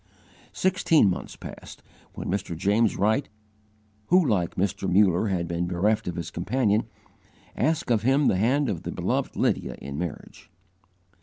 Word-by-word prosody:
Sixteen 165 - +3
months - - -6
passed, - - -11 0.3
when - - -6
Mr. 95 -3 -3
James 105 +5 +2
Wright, 110 +7 +1 0.8
who 180 0 +4
like 90 -9 0
Mr. 95 0 -1
Muller 95 +1 +4
had 90 -4 -1
been 85 +1 -2
bereft 105 +5 0
of 90 - -3
his 85 - -5
companion, 110 +3 0 0.7
asked 160 +1 0
of 110 -3 +3
him 135 +5 +3
the 95 - +3
hand 130 +8 +2
of 95 -7 -2
the - - -5
beloved - - -2
Lydia - - 0
in 70 +2 -6
marriage. 85 -4 -7
105 Hz, 150 wpm, -25 LUFS, 90-125 Hz, 0.8 s, who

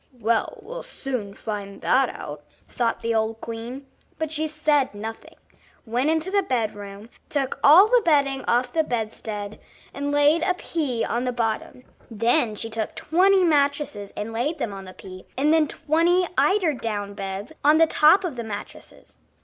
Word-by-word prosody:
"Well, 230 0 0
we'll - - -7
soon 255 - -5
find 200 -2 -6
that 265 -1 +3
out," 145 0 -8 0.3
thought 235 -2 -2
the 230 0 0
old 220 0 0
queen. 230 +4 -7 0.3
But 315 -1 -3
she 315 0 -1
said 300 -5 +1
nothing, 220 +2 -8 0.5
went 245 +6 0
into 320 +3 0
the 400 0 +3
bed 235 - -1
room, 200 +1 -9 0.2
took 275 -3 -2
all 330 +8 +9
the - - +4
bedding 280 -4 +2
off 245 +1 +1
the 320 - +2
bedstead, 215 -4 -4 0.3
and 285 +1 -3
laid 290 +3 +4
a 365 +1 +1
pea 290 -10 -2
on 240 +1 -1
the 250 - 0
bottom; 235 +1 -3 0.3
then 230 +1 +1
she 225 - -5
took 220 -1 -4
twenty 375 +3 +3
mattresses 285 - +1
and 215 +2 -4
laid 275 +8 -1
them 230 -8 -3
on 195 -1 -8
the 185 - -10
pea, 185 -1 -11
and 295 +4 +3
then 315 -2 +4
twenty 335 +6 +2
eider 380 -6 +3
down 205 -5 -4
beds 195 +5 -5
on 300 +2 +6
top 315 +6 +5
of 325 -9 -4
the 235 - -3
mattresses. 210 -2 -9
250 Hz, 170 wpm, -24 LUFS, 220-310 Hz, 0.5 s, all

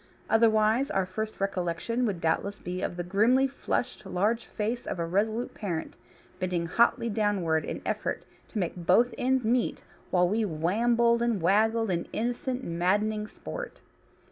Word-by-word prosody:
Otherwise 225 +3 +4
our 190 -1 +1
first 215 +4 -5
recollection 195 +5 -1
would 195 -5 -2
doubtless 200 +5 -1
be 180 +1 -5
of 175 - -3
the 175 - -2
grimly 220 +9 +3
flushed 255 -2 -3
large 210 +4 0
face 225 +3 -3
of - - -3
a 170 - -1
resolute 215 +7 0
parent, 175 -7 -4 0.5
bending 180 -2 -1
hotly 235 +6 +2
downward 200 -7 +1
in - - -5
effort - - -2 0.2
to - - -6
make 180 -5 -1
both 185 +8 +3
ends 260 0 +1
meet 240 +1 +1 0.3
while 180 -1 +3
we 215 +5 +1
wambled 230 +7 +2
and 235 -4 +1
waggled 220 +4 +2
in 170 -1 -1
innocent, 245 +3 -2
maddening 210 +5 0
sport. - - -8
210 Hz, 150 wpm, -28 LUFS, 180-235 Hz, 0.5 s, Otherwise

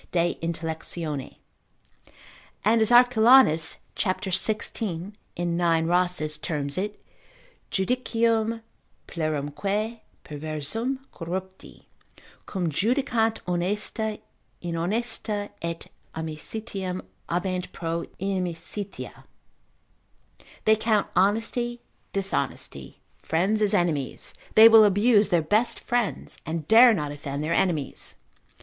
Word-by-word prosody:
de 175 0 +2
Intell. 160 -3 -4 1.3
And 225 +2 +4
as 220 - +3
Arculanus, 240 -8 +6 0.2
c. 190 -1 -1
16. 205 -2 -1 0.2
in 175 -1 -1
9. 165 -2 +2
Rhasis, 175 -3 +1
terms 145 -3 -2
it, 205 +3 -3 0.7
Judicium 230 +1 0 0.4
plerumque 170 +9 -2 0.3
perversum, 155 - -3
corrupti, 185 +2 -7 0.6
cum 180 -5 -2
judicant 225 - +1
honesta 210 +4 -2 0.4
inhonesta, 205 +4 -2
et 170 0 -4 0.3
amicitiam 185 +4 -5 0.2
habent 180 +1 -2
pro 165 0 -3
inimicitia: 190 +1 -4 1.4
they 220 - +6
count 220 -1 +1
honesty 225 +5 +1 0.3
dishonesty, 195 0 -2 0.2
friends 195 +7 0
as 210 -2 +3
enemies, 155 -7 -1 0.2
they 220 +1 +10
will 225 -1 +8
abuse 205 +1 +4
their 175 -4 +2
best 215 +9 +1
friends, 240 -4 -2
and 160 -2 -4
dare 235 +2 +8
not 150 -4 -3
offend 145 0 -5
their 160 +2 0
enemies. 165 -6 -1
190 Hz, 90 wpm, -26 LUFS, 165-220 Hz, 1.4 s, they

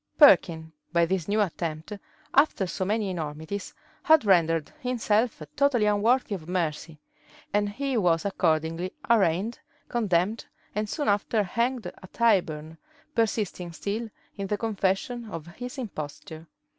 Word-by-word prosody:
Perkin, 170 - +6 0.2
by 170 -1 +4
this 180 -1 -1
new 210 +1 +2
attempt, 165 -1 -3 0.4
after 275 -8 +4
so 185 +1 -3
many 205 0 0
enormities, 160 +3 -5 0.3
had 315 -7 +5
rendered 165 -5 +3
himself 230 -5 0
totally 265 -6 +3
unworthy 215 +3 +2
of 170 -4 -6
mercy; 165 -3 -2 0.5
and 205 0 +2
he 270 +5 -2
was 170 -5 +2
accordingly 165 -2 0 0.2
arraigned, 205 +1 +2 0.3
condemned, 210 -2 +1 0.3
and 210 +1 -2
soon 290 +3 -2
after 205 +1 +2
hanged 235 +4 -1
at 185 +1 -10
Tyburn, 165 -9 +1 0.3
persisting 210 - -1
still 215 +6 -3 0.3
in 200 -1 -3
the 210 - -1
confession 220 +2 -1
of 165 -6 -6
his 245 +10 -8
imposture. 160 - -7
200 Hz, 130 wpm, -27 LUFS, 170-225 Hz, 0.5 s, Perkin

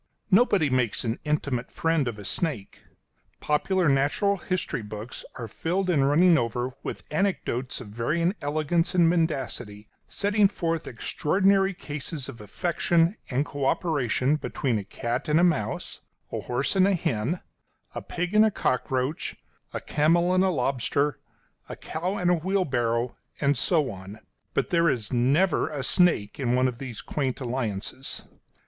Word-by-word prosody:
Nobody 195 - +4
makes 125 -4 +1
an 115 0 -2
intimate 145 -5 -1
friend 165 -4 0
of 115 -3 -3
a 105 - -9
snake. 120 - -3 0.5
Popular 175 +4 +1
natural 145 +9 +2
history 180 -8 -2
books 105 +3 -7
are 115 - -5
filled 180 - -1
and 140 -4 +3
running 170 +2 +5
over 120 +2 -2
with - - -6
anecdotes 150 -8 -1
of 120 -5 -9
varying 155 - 0
elegance 155 +4 0
and 170 -2 +5
mendacity, 135 -11 -1 0.2
setting 205 0 +3
forth 165 -4 -2
extraordinary 195 - +1
cases 145 -2 -5
of 115 - -9
affection 170 - +1
and 135 +3 0
co 140 -2 -3
operation 140 -3 +1
between 130 -6 -1
a - - -5
cat 120 +7 -3
and 150 +2 +4
a - - +4
mouse, 135 -12 0 0.3
a - - -2
horse 130 +8 -1
and 190 0 +5
a 200 - +3
hen, 135 +2 -1 0.5
a - - -4
pig 180 +3 -3
and 215 0 +7
a 220 - +5
cockroach, 130 -4 -1 0.4
a - - -3
camel 170 +4 +2
and 185 0 +4
a 190 - +3
lobster, 140 -1 0 0.5
a - - -5
cow 180 +5 -3
and 180 -2 +2
a - - +5
wheelbarrow, 130 -10 0 0.2
and 140 0 +2
so 155 -4 +2
on; 95 +2 -10 0.4
but - - 0
there 170 -1 +4
is 115 -3 -2
never 140 +9 +2
a 145 -3 -4
snake 170 - +2
in 125 -2 +1
one 130 +1 +3
of 125 -1 -4
these 125 -5 -6
quaint 135 -3 -2
alliances. 125 -1 -3
145 Hz, 155 wpm, -26 LUFS, 125-175 Hz, 0.5 s, and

